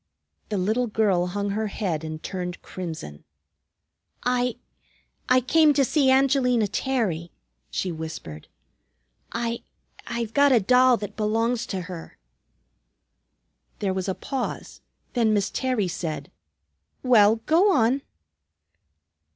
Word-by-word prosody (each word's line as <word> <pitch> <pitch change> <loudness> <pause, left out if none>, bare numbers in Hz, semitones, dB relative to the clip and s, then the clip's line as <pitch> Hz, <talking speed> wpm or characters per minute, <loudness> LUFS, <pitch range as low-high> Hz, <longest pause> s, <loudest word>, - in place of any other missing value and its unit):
The 210 - -1
little 220 +7 +1
girl 200 -5 +1
hung 200 +2 -2
her 215 +2 -1
head 180 -6 -2
and 155 0 -6
turned 180 -2 -4
crimson. 160 - -7 1.0
"I 250 -1 +1 0.7
I 255 0 +5
came 305 +4 +4
to 275 - +4
see 275 0 +2
Angelina 260 -4 +3
Terry," 200 - -1 0.4
she 185 - -2
whispered. 160 - -7 0.8
"I 230 0 -2 0.5
I've 235 -2 -3
got 285 -1 +5
a 240 - +6
doll 250 +4 +5
that 205 -2 -7
belongs 225 +3 0
to 190 -2 -3
her." 175 -2 -9 1.6
There 195 -2 -1
was 190 0 -2
a 190 - -1
pause, 265 -2 -5 0.3
then 225 -3 +2
Miss 200 -1 0
Terry 255 -7 0
said, 165 -2 -4 0.7
"Well, 220 -4 +6
go 360 +6 +4
on." 255 -2 +3
220 Hz, 120 wpm, -25 LUFS, 185-250 Hz, 1.6 s, a